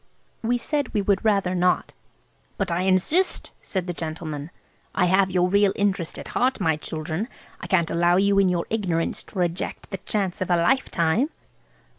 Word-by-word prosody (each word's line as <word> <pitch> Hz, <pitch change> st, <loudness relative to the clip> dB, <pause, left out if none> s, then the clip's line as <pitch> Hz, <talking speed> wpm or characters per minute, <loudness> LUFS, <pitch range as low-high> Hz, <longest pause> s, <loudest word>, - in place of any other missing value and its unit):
We 240 Hz, +2 st, +1 dB
said 285 Hz, +1 st, -1 dB
we 205 Hz, -, +2 dB
would 200 Hz, -1 st, +1 dB
rather 200 Hz, -4 st, +2 dB
not. 180 Hz, 0 st, +1 dB, 0.6 s
"But 190 Hz, -3 st, -1 dB
I 170 Hz, +1 st, 0 dB
insist," 190 Hz, -, +1 dB
said 190 Hz, -3 st, -3 dB
the 175 Hz, -, -3 dB
gentleman. 155 Hz, -2 st, -5 dB, 0.5 s
"I 180 Hz, -, +3 dB
have 190 Hz, +2 st, +3 dB
your 180 Hz, -1 st, +2 dB
real 200 Hz, +1 st, +3 dB
interest 195 Hz, -5 st, -1 dB
at -, -, -8 dB
heart, 255 Hz, 0 st, +1 dB
my 160 Hz, -5 st, +2 dB
children–I 160 Hz, -, -6 dB
can't 170 Hz, -4 st, +2 dB
allow 175 Hz, +1 st, +3 dB
you 200 Hz, +1 st, +3 dB
in 195 Hz, -2 st, +4 dB
your 175 Hz, -2 st, 0 dB
ignorance 180 Hz, -7 st, -1 dB
to -, -, -12 dB
reject 175 Hz, +2 st, -2 dB
the 195 Hz, -, -2 dB
chance 195 Hz, -2 st, -2 dB
of 185 Hz, -, -1 dB
a 175 Hz, -, +4 dB
lifetime." 175 Hz, -, +2 dB
185 Hz, 170 wpm, -24 LUFS, 170-200 Hz, 0.6 s, in